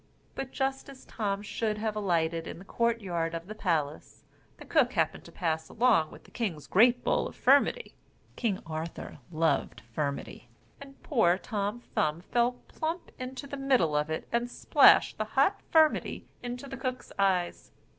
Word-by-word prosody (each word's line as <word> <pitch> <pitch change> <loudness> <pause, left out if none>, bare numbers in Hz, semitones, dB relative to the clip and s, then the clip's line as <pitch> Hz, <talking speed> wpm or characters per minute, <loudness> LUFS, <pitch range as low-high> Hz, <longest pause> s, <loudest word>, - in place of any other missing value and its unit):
But 270 -1 -5
just 270 +1 -2
as 270 -1 -13
Tom 205 -2 -2
should 210 0 -2
have 215 0 -2
alighted 165 -5 0
in - - -6
the 185 - -12
court 235 +2 0
yard 170 -4 -2
of 165 0 -5
the 210 - -7
palace, 160 -8 -2 0.3
the - - -11
cook - - +2
happened - - 0
to - - -12
pass 160 -3 -2
along 220 -10 +3
with - - -14
the - - -19
king's 185 - -3
great 240 +5 +4
bowl - - +1
of - - -11
firmity 480 - +3 0.4
(King 215 -6 -1
Arthur 160 -1 -6
loved 160 -3 0
firmity), 140 -2 -3 0.4
and 275 -1 -13
poor 205 - +3
Tom 210 +2 -3
Thumb 155 +2 0
fell 240 +6 +1
plump 325 +3 -4
into 255 +2 -6
the 280 0 -6
middle 260 - +2
of 150 +1 +1
it 160 - -3
and 235 +1 0
splashed - - +5
the - - 0
hot - - +4
firmity 315 -1 +3 0.2
into 245 +2 -6
the 270 - -7
cook's 255 0 -4
eyes. 185 -3 0
210 Hz, 170 wpm, -29 LUFS, 165-250 Hz, 0.4 s, splashed